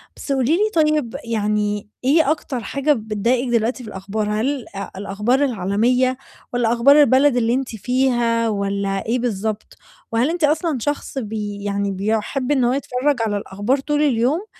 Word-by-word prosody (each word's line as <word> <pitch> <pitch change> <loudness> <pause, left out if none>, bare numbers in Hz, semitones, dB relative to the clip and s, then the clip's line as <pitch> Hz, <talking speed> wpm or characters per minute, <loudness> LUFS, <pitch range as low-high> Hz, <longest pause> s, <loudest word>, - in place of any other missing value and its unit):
بس - - -6
قولي 265 +1 +1
لي 420 +6 +3
طيب، 300 -6 0
يعني 210 -2 -1 0.2
إيه 300 +2 +4
أكتر 295 -4 -3
حاجة 280 +7 +1
بتضايقِك 230 +2 -1
دلوقتي 235 +2 0
في 215 - -8
الأخبار، 205 +2 -3
هل 250 +5 -1
آآ، 195 0 -5
الأخبار 210 +7 0
العالمية 245 +4 +1 0.4
والّا 235 -1 +2
أخبار 280 +5 +6
البلد 275 -1 +4
اللي 235 0 +2
أنتِ 265 0 -1
فيها 240 -1 +1
والّا 200 -1 -2
إيه 240 +3 0
بالضبط؟ 220 -2 -3 0.3
وهل 230 +5 +2
أنتِ 340 0 -3
أصلًا 305 0 +2
شخص 290 +1 -3
بي 210 -3 -4
يعني 200 0 -1
بيُحب 220 +7 -1
إن 265 -3 +3
هو 240 +1 +2
يتفرَّج 270 0 -1
على 205 -2 -1
الأخبار 205 +6 -1
طول 295 +2 -1
اليوم 280 - +1
240 Hz, 160 wpm, -20 LUFS, 210-275 Hz, 0.4 s, أخبار